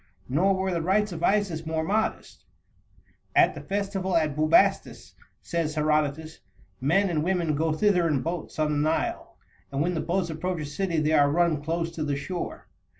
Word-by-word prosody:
Nor 185 Hz, +9 st, +2 dB
were 190 Hz, 0 st, -1 dB
the 170 Hz, -, -1 dB
rites 205 Hz, +4 st, +1 dB
of 165 Hz, -2 st, -6 dB
Isis 190 Hz, -4 st, +1 dB
more 160 Hz, 0 st, -1 dB
modest. 210 Hz, +6 st, -2 dB, 0.9 s
"At -, -, +5 dB
the -, -, -8 dB
festival 195 Hz, -2 st, -1 dB
at 155 Hz, -3 st, 0 dB
Bubastis," 155 Hz, +1 st, +2 dB, 0.3 s
says 165 Hz, -2 st, -2 dB
Herodotus, 155 Hz, +1 st, 0 dB, 0.4 s
"men 185 Hz, +9 st, +2 dB
and 160 Hz, -4 st, -1 dB
women 175 Hz, -3 st, 0 dB
go 160 Hz, +2 st, 0 dB
thither 180 Hz, +1 st, +2 dB
in 145 Hz, -5 st, 0 dB
boats 170 Hz, 0 st, -5 dB
on 155 Hz, -1 st, +1 dB
the 145 Hz, -, 0 dB
Nile, 160 Hz, -, -3 dB, 0.3 s
and 135 Hz, -, -3 dB
when 175 Hz, +4 st, +1 dB
the 160 Hz, -, -1 dB
boats 175 Hz, -1 st, -1 dB
approach 180 Hz, +2 st, -3 dB
a -, -, -4 dB
city 165 Hz, +3 st, -2 dB
they 155 Hz, +1 st, +1 dB
are 145 Hz, -2 st, +5 dB
run 165 Hz, -1 st, +1 dB
close 165 Hz, +1 st, -2 dB
to 165 Hz, -2 st, -4 dB
the 145 Hz, -2 st, -1 dB
shore. 175 Hz, +5 st, -5 dB
165 Hz, 180 wpm, -26 LUFS, 155-185 Hz, 0.9 s, At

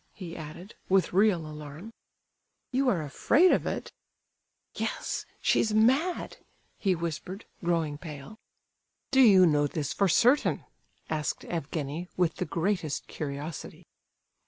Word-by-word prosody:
he 175 Hz, -3 st, -8 dB
added, 165 Hz, +6 st, -9 dB, 0.2 s
with 190 Hz, -2 st, +3 dB
real 190 Hz, -4 st, +3 dB
alarm. 150 Hz, +7 st, -9 dB, 0.8 s
"You 265 Hz, +1 st, +2 dB
are 175 Hz, -9 st, +1 dB
afraid 300 Hz, -, +4 dB
of -, -, +1 dB
it?" -, -, -4 dB, 0.8 s
"Yes—she's 215 Hz, -1 st, -1 dB
mad!" 265 Hz, +11 st, +2 dB, 0.4 s
he 190 Hz, -3 st, +2 dB
whispered, 170 Hz, +4 st, -5 dB, 0.2 s
growing 165 Hz, -4 st, 0 dB
pale. 155 Hz, +6 st, -9 dB, 0.7 s
"Do 265 Hz, -1 st, +5 dB
you 195 Hz, -7 st, +8 dB
know 145 Hz, -3 st, +3 dB
this 145 Hz, -1 st, -3 dB
for 200 Hz, -, +2 dB
certain?" 245 Hz, -, +3 dB, 0.5 s
asked 155 Hz, -1 st, -2 dB
Evgenie, 160 Hz, +1 st, -4 dB
with 170 Hz, -3 st, +1 dB
the 180 Hz, -, -1 dB
greatest 170 Hz, -2 st, -1 dB
curiosity. 145 Hz, +1 st, -6 dB
175 Hz, 115 wpm, -28 LUFS, 155-210 Hz, 0.8 s, you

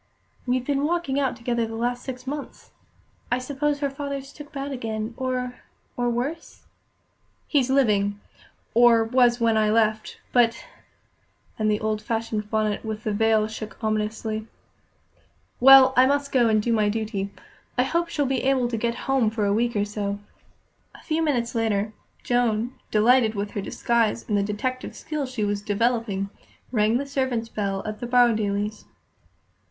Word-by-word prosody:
"We've 250 Hz, 0 st, 0 dB
been 280 Hz, 0 st, 0 dB
walking 320 Hz, -4 st, 0 dB
out 265 Hz, -3 st, 0 dB
together 235 Hz, -1 st, -1 dB
the 225 Hz, -, -6 dB
last 245 Hz, +2 st, -1 dB
six 255 Hz, -1 st, -7 dB
months. 285 Hz, +2 st, -7 dB, 0.6 s
I 245 Hz, -, +3 dB
suppose 285 Hz, +3 st, -2 dB
her 280 Hz, -, +1 dB
father's 275 Hz, -1 st, -5 dB
took 295 Hz, 0 st, -11 dB
bad 280 Hz, -1 st, -5 dB
again, 225 Hz, -3 st, -4 dB
or 255 Hz, -1 st, -3 dB, 0.3 s
or 245 Hz, 0 st, 0 dB
worse?" 270 Hz, +8 st, -4 dB, 0.8 s
"He's 270 Hz, -4 st, +2 dB
living 205 Hz, -7 st, +2 dB, 0.5 s
or 235 Hz, -1 st, +6 dB
was 240 Hz, +1 st, +3 dB
when 230 Hz, -1 st, +3 dB
I 215 Hz, -1 st, +3 dB
left; 215 Hz, 0 st, +1 dB
but 230 Hz, -2 st, +3 dB, 0.5 s
" -, -, -40 dB
and 215 Hz, 0 st, +2 dB
the 210 Hz, 0 st, +1 dB
old 215 Hz, -1 st, -1 dB
fashioned 225 Hz, -1 st, -3 dB
bonnet 215 Hz, -2 st, 0 dB
with 215 Hz, -1 st, -5 dB
the 215 Hz, -, -1 dB
veil 220 Hz, 0 st, +3 dB
shook 215 Hz, 0 st, -8 dB
ominously. 215 Hz, 0 st, -2 dB, 1.1 s
"Well, 265 Hz, 0 st, +9 dB
I 255 Hz, +1 st, +6 dB
must 280 Hz, 0 st, 0 dB
go 240 Hz, -3 st, +4 dB
and 215 Hz, -1 st, +2 dB
do 235 Hz, -, +1 dB
my 210 Hz, -2 st, +2 dB
duty. 210 Hz, -2 st, -2 dB, 0.5 s
I 250 Hz, -, +4 dB
hope 335 Hz, +5 st, 0 dB
she'll 295 Hz, -3 st, 0 dB
be 265 Hz, -1 st, 0 dB
able 265 Hz, -2 st, +2 dB
to 230 Hz, -, -2 dB
get 235 Hz, +1 st, -1 dB
home 265 Hz, -5 st, +2 dB
for 215 Hz, -1 st, -1 dB
a 200 Hz, -, +2 dB
week 235 Hz, +2 st, 0 dB
or 205 Hz, 0 st, +1 dB
so." 205 Hz, -1 st, -3 dB, 0.8 s
A -, -, -15 dB
few 320 Hz, 0 st, -1 dB
minutes 250 Hz, -7 st, 0 dB
later, 220 Hz, -2 st, 0 dB, 0.3 s
Joan, 240 Hz, -1 st, +1 dB, 0.2 s
delighted 225 Hz, +1 st, +4 dB
with 205 Hz, 0 st, -3 dB
her 205 Hz, -, -3 dB
disguise 230 Hz, +2 st, 0 dB
and 210 Hz, -, 0 dB
the 200 Hz, -, +3 dB
detective 215 Hz, +6 st, -3 dB
skill 300 Hz, -3 st, -4 dB
she 255 Hz, -4 st, -3 dB
was 205 Hz, 0 st, -1 dB
developing, 210 Hz, -2 st, 0 dB, 0.4 s
rang 220 Hz, -1 st, +2 dB
the 280 Hz, -, -3 dB
servants' 260 Hz, -5 st, -1 dB
bell 195 Hz, -3 st, -2 dB
at 215 Hz, 0 st, -5 dB
the 240 Hz, -, -4 dB
Borrowdailes'. 215 Hz, -4 st, +1 dB
235 Hz, 165 wpm, -24 LUFS, 215-260 Hz, 1.1 s, Well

